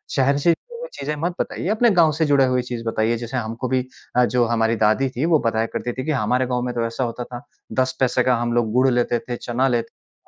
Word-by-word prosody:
शहर 140 +1 +3
से 170 +4 +3
जुड़ी 470 - -6
हुई - - -6
चीज़ें 150 +2 -2
मत 175 - 0
बताइए, - - -3
अपने 225 +3 +3
गाँव 170 -5 +4
से 160 - +3
जुड़े 140 -2 +4
हुए 125 -1 +1
चीज़ 120 -1 -6
बताइए 115 +1 0
जैसे 120 +2 -5
हमको 115 +2 -3
भी 130 0 +1 0.3
अ, 125 0 +5
जो 120 0 +2
हमारी 115 0 +1
दादी 130 +6 +2
थी, 130 +4 -2
वो 165 -2 +4
बताया 110 0 +1
करती 120 - -3
थी 130 - -5
कि, 155 - 0
हमारे 125 0 +1
गाँव 125 -1 -1
में 125 - -3
तो 115 -1 0
ऐसा 115 +3 -3
होता 120 0 -3
था। 120 0 -9 0.4
10 130 0 -1
पैसे 125 -1 +2
का 125 -1 +3
हम 120 0 -1
लोग 120 -2 +1
गुड़ 130 +1 +4
लेते 120 -1 +1
थे, 120 +1 -5
चना 125 +3 -1
लेते 120 -3 0
थे। - - -42
125 Hz, 265 wpm, -22 LUFS, 120-135 Hz, 0.4 s, अ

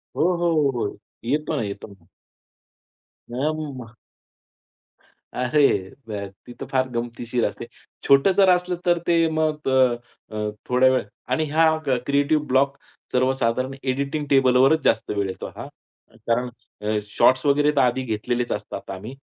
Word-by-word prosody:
हो, - - -1 0.2
हो, 170 0 +1
हो, 145 -3 +3
हो. 100 - -3 0.3
येतो 150 +5 -1
ना, - - -1
येतो 100 0 -6
ना. 100 -5 -18 1.2
ना, 120 - -6
ना, 155 -1 -5
ना. 120 -1 -11 1.4
अरे 125 +4 +1 0.5
त - - -8 0.4
ती 120 - -9
तर - - -5
फार 130 -1 +1
गमतीशीर 120 0 -2
असते. - - -4 0.4
छोटं 140 +7 +5
जर 195 -2 +6
असलं 180 0 +2
तर 175 -1 +3
ते 165 -1 +4
मग 155 -2 -1
अ, 130 -2 +4 0.4
अ, 105 0 -2 0.2
थोड्या 125 +1 +5
वेळ 130 - +1 0.3
आणि 155 +4 +1
हा 160 +1 +3 0.3
क्रिएटिव्ह 145 +2 +1
ब्लॉक 135 +2 +2 0.3
सर्वसाधारण 130 0 0
एडिटिंग 140 +3 -2
टेबलवरच 135 +3 +4
जास्त 110 -1 +2
वेळ 100 -1 -1
येतो 95 - -6
हा. - - -7 0.6
कारण 120 +1 +1 0.3
अ, 105 0 0
शॉट्स 130 +5 +3
वगैरे 145 +1 +3
तर 140 - +4
आधी 125 +1 +2
घेतलेलेच 120 +2 -2
असतात - - -5
आम्ही. 105 +7 -8
130 Hz, 150 wpm, -23 LUFS, 120-150 Hz, 1.4 s, जर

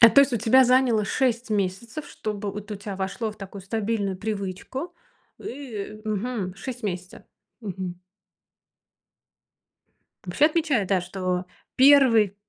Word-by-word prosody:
а 230 - +10
то 280 - +7
есть 280 -1 +3
у - - +2
тебя 240 +4 +5
заняло 250 -4 +4
6 240 0 0
месяцев, 210 +7 -2
чтобы 210 -2 -4
вот 210 0 -8
у 210 - -3
тебя 200 0 -6
вошло 195 +4 -2
в - - -19
такую 195 0 -9
стабильную 205 -1 -1
привычку. 205 - -4 0.4
Ы, 220 -6 -7
мгм, 215 -3 -2
6 245 +5 -7
месяцев, 180 -3 -5 0.4
мгм. 185 -4 -5 2.3
Вообще 185 +10 +2
отмечают, 305 - +1
да, 190 -2 +3
что 180 0 -2 0.3
1. 255 -7 +6
215 Hz, 130 wpm, -25 LUFS, 195-245 Hz, 2.3 s, а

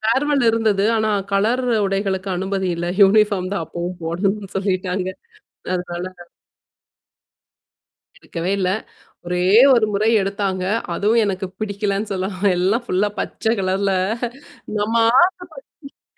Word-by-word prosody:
Farewell 270 +5 +1
இருந்தது. 220 -3 +2
ஆனா, 220 -1 +1 0.2
colour 225 +6 +1 0.2
உடைகளுக்கு 195 -1 -2
அனுமதி 190 +1 -2
இல்ல 170 +1 -3 0.2
யூனிபார்ம் 200 -2 +3
தான் 200 - -1
அப்பவும் 175 +2 -5
போடணும்னு 195 +4 -2
சொல்லிட்டாங்க 185 -1 -1 0.7
அதனால 180 0 -4 2.1
எடுக்கவே 175 - -5
இல்ல. 185 -2 0 0.6
ஒரே 180 0 -2 0.3
1 235 -3 +4
முறை 205 +2 +1
எடுத்தாங்க. 195 -1 -2 0.3
அதுவும் 215 +6 +2
எனக்குப் 190 -1 -4
பிடிக்கலேன்னு 205 0 -2
சொல்லாம், 190 0 -3 0.2
எல்லாம் 200 +7 +1
ஃபுல்லா 200 0 +1
பச்ச - - -6
கலர்ல 195 +1 0 0.9
நம்ம - - -1
நம்ம 215 +3 -1 1.1
ஆசப் - - -55
195 Hz, 110 wpm, -20 LUFS, 185-210 Hz, 2.1 s, 1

